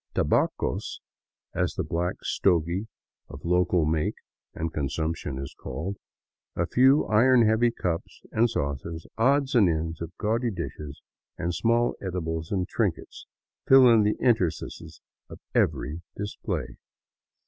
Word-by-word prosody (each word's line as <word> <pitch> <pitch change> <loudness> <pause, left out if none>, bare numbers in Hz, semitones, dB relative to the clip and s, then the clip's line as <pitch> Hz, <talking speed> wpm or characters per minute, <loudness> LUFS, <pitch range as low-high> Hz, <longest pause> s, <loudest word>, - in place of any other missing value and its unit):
Tabacos," - - 0 0.5
as - - -1
the - - -1
black 85 +2 -2
stogie 90 +3 +1 0.4
of 70 +3 -10
local 90 -1 +2
make 80 0 0 0.4
and 80 0 -3
consumption 80 -1 -2
is 70 0 -6
called, 95 +6 -5 0.6
a - - 0
few 130 +4 +4
iron 120 +2 +5
heavy 110 +2 +3
cups 90 -7 -4
and 115 +2 +3
saucers, 80 - -3
odds 135 +3 +3
and 110 -8 +5
ends 80 +1 -2
of 85 0 -5
gaudy 115 +3 0
dishes, 75 -8 -7 0.3
and 85 +1 -2
small 115 +6 +2
edibles 80 -4 -3
and 95 -2 0
trinkets, 100 -7 -3 0.4
fill 135 -1 +8
in 115 -2 +6
the 105 0 +1
interstices 110 -10 -1 0.3
of - - -9 0.2
every 80 +4 0 0.2
display. 105 0 -4
90 Hz, 125 wpm, -26 LUFS, 80-115 Hz, 0.6 s, fill